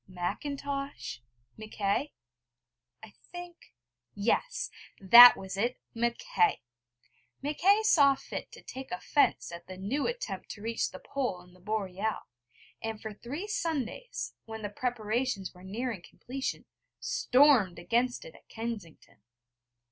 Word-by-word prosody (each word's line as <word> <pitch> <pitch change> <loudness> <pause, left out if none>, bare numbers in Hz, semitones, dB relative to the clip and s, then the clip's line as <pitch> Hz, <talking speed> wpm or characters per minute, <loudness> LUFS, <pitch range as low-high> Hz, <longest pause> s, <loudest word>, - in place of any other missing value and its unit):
Macintosh? 275 - -4 0.4
Mackay? 215 +5 -1 0.9
I 215 -2 -12 0.2
think 350 - -10 0.4
yes, 235 - 0 0.3
that 235 +6 +11
was 190 0 -6
it! 240 +5 0 0.2
Mackay. 400 - +1 0.8
Mackay 385 +9 +3
saw 285 -10 +6
fit - - -7
to - - -12
take 265 +1 -8
offence 180 - +1
at 170 0 -9
the 185 0 -8
new 225 +10 -1
attempt 485 +1 -4
to 205 - -8
reach 230 0 -1
the 185 - -9
Pole 250 -5 -3
in 180 0 -19
the 185 - -19
Boreal; 210 +1 -2 0.6
and 225 -1 -4
for 220 -1 -6
three 270 - -6
Sundays, 415 - -3
when 220 -1 -7
the 205 - -2
preparations 235 -2 -2
were 180 - -16
nearing 220 +1 -4
completion, 260 +9 -5 0.3
stormed 280 - +4
against 240 - 0
it - - -10
at - - -20
Kensington. 220 - -7
235 Hz, 125 wpm, -30 LUFS, 200-285 Hz, 0.9 s, that